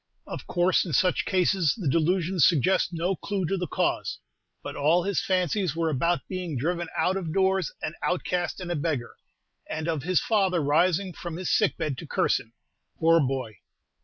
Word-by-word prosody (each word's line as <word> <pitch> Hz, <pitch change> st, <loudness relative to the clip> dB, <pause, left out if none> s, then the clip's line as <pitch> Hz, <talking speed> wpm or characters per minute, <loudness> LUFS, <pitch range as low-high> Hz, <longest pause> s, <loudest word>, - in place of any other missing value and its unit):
Of -, -, -7 dB
course 180 Hz, +1 st, +2 dB
in 170 Hz, -, -5 dB
such 180 Hz, +7 st, +2 dB
cases 185 Hz, -4 st, +2 dB
the 190 Hz, -9 st, -3 dB
delusions 170 Hz, +3 st, +2 dB
suggest 180 Hz, +4 st, +2 dB
no 175 Hz, +3 st, -1 dB
clew 195 Hz, 0 st, -3 dB
to 195 Hz, -, 0 dB
the 180 Hz, -2 st, -3 dB
cause, -, -, -1 dB, 0.5 s
but -, -, -6 dB
all 160 Hz, +5 st, +3 dB
his 200 Hz, +1 st, 0 dB
fancies 185 Hz, -2 st, 0 dB
were 165 Hz, -1 st, 0 dB
about 160 Hz, +2 st, 0 dB
being 180 Hz, -6 st, -4 dB
driven 170 Hz, +6 st, -1 dB
out 185 Hz, +1 st, +1 dB
of 170 Hz, -4 st, -4 dB
doors 190 Hz, -2 st, +1 dB
an 155 Hz, -, -2 dB
outcast 180 Hz, 0 st, -1 dB
and 180 Hz, -2 st, -5 dB
a -, -, 0 dB
beggar, 145 Hz, -6 st, -2 dB, 0.5 s
and 155 Hz, +1 st, -3 dB
of 160 Hz, -4 st, -1 dB
his 180 Hz, +4 st, +2 dB
father 195 Hz, -5 st, +1 dB
rising 175 Hz, +5 st, +2 dB
from 170 Hz, -1 st, -6 dB
his 185 Hz, +2 st, -3 dB
sick 210 Hz, -4 st, +2 dB
bed 155 Hz, -6 st, -3 dB
to 165 Hz, -, -8 dB
curse -, -, +1 dB
him. 115 Hz, -, -15 dB, 0.4 s
Poor 165 Hz, 0 st, +4 dB
boy! 130 Hz, -, -2 dB
175 Hz, 185 wpm, -26 LUFS, 155-185 Hz, 0.5 s, Poor